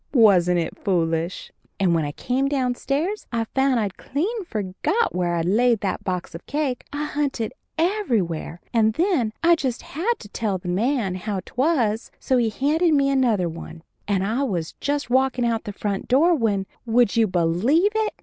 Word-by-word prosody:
Wasn't 180 -7 +5
it 165 -1 -3
foolish? 165 -2 -1 0.3
And 185 -3 +3
when 160 -2 +1
I 145 - -3
came 255 - -1
downstairs 275 - -1
I 230 -1 0
found 265 +2 +1
I'd 200 -3 -2
clean 390 - -2
forgot 215 - -1
where 175 -1 0
I'd 165 -1 -1
laid 230 +4 +3
that 190 -2 -2
box 180 -2 -3
of 165 - -8
cake. 285 -4 -2
I 290 +1 -3
hunted 280 -6 -2 0.2
everywhere, 235 - 0
and 220 -2 +3
then 325 - +1
I 340 +1 +6
just 260 -6 -3
had 365 +11 -1
to 210 - -11
tell 205 -2 -1
the 180 0 -7
man 220 +1 0
how 190 +1 -3
'twas, 250 -6 0
so 260 - +1
he 235 -2 +2
handed 305 +8 +2
me 275 -1 +3
another 235 -9 +2
one, 165 0 -8 0.2
and 195 -2 +1
I 225 +6 0
was 180 - -2
just 285 -3 -1
walkin' 260 -1 +2
out 230 -1 -1
the 205 - -4
front 200 -1 -3
door 310 +8 +4
when, 215 - 0 0.2
would 235 -2 +3
you 225 -1 +4
believe 190 - +2
it! 440 -1 0
230 Hz, 180 wpm, -23 LUFS, 190-280 Hz, 0.3 s, I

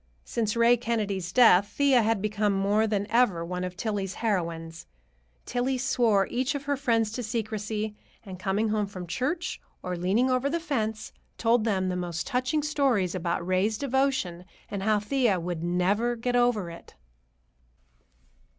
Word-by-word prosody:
Since 220 -2 -2
Ray 235 +1 +5
Kennedy's 205 -6 -2
death, 205 -3 +6
Thea 275 -4 +5
had 220 -2 0
become 210 -1 +1
more 200 +3 +2
than 205 -2 0
ever 220 -8 +3
one 180 +1 -4
of 180 0 -5
Tillie's 200 -4 -2
heroines. 165 -6 -3 0.6
Tillie 255 +2 -1
swore 230 -6 +2
each 255 +3 0
of 285 - -4
her 285 0 0
friends 230 -5 +1
to 245 - -4
secrecy, 215 -2 -3 0.3
and, 185 -2 -8
coming 200 +4 0
home 210 -1 0
from 185 -2 -7
church 310 - -2 0.2
or 180 0 -3
leaning 190 +8 +1
over 255 +2 +1
the 335 +3 -1
fence, 220 -9 -3 0.2
told 230 -1 +2
them 190 -4 +1
the 180 - -2
most 175 -2 -3
touching 265 +3 0
stories 270 - +1
about 175 -1 -2
Ray's 185 +4 +1
devotion, 265 -10 0 0.3
and 200 - -3
how 215 +1 +2
Thea 220 -3 +1
would 170 -1 -4
"never 195 +7 +1
get 245 +1 -2
over 240 -8 +2
it." 170 - -13
215 Hz, 160 wpm, -27 LUFS, 185-245 Hz, 0.6 s, death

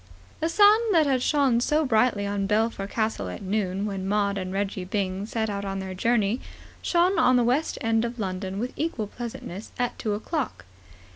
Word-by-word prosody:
The 325 - 0
sun 415 +5 +6
that 320 -3 +5
had 265 -3 +1
shone 270 -4 +3
so 300 +4 +2
brightly 220 -4 +2
on 200 -1 -1
Belpher 215 -1 0
Castle 215 - -2
at 90 - -7
noon, 195 0 -1
when 195 -2 -3
Maud 200 0 +1
and 185 -2 -4
Reggie 195 -1 -2
Byng 190 +1 -2
set 220 -1 -1
out 200 -1 -3
on 195 -1 -3
their 190 -1 -5
journey, 220 +3 +1 0.4
shone 355 +2 +2
on 255 - +5
the 245 - +4
West 255 +7 +1
End 225 0 +2
of 235 +1 -3
London 190 -2 -3
with 245 +5 -3
equal 295 -8 -2
pleasantness 220 -3 -7
at 245 -1 -2
two 215 - -1
o'clock. 245 - -3
215 Hz, 190 wpm, -26 LUFS, 195-250 Hz, 0.4 s, sun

